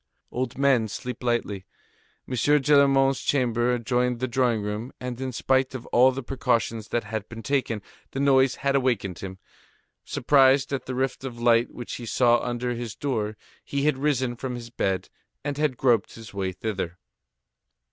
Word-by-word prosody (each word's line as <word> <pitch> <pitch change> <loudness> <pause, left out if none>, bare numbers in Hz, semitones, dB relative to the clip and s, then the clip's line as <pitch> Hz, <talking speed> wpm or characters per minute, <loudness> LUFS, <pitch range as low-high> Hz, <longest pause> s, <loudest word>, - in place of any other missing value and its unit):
Old 125 -1 -3
men 135 -5 +3
sleep 125 +3 -6
lightly; 120 -6 -1 0.6
M. - - -5
Gillenormand's 135 0 +4
chamber 120 -3 +1
adjoined 125 +1 0
the 130 - -1
drawing 120 -3 +1
room, 105 +4 -4
and 125 0 -5
in 130 -1 -2
spite 130 +2 +1
of 125 - -6
all 130 +2 +6
the 135 +1 -5
precautions 120 -4 -1
that 120 - -1
had 110 0 -5
been 115 -1 -8
taken, 120 -5 -1 0.3
the 135 - -5
noise 135 -2 +4
had 140 0 +3
awakened 115 -9 0
him. 95 -1 -7 0.7
Surprised 135 +1 +3
at 130 -2 -3
the 130 - -3
rift 130 0 -1
of 125 -3 -6
light 120 0 +4
which 120 - -7
he 120 - -8
saw 120 0 +4
under 120 0 -2
his 120 -2 -5
door, 110 -6 -2 0.3
he 140 0 -2
had 150 -1 +3
risen 130 -4 0
from 125 +1 -4
his 120 -1 -8
bed, 95 -5 -1 0.4
and 145 0 -3
had 150 -5 +1
groped 120 -6 +2
his 115 -2 -11
way 95 -2 -2
thither. 95 -2 -4
125 Hz, 170 wpm, -25 LUFS, 115-135 Hz, 0.7 s, all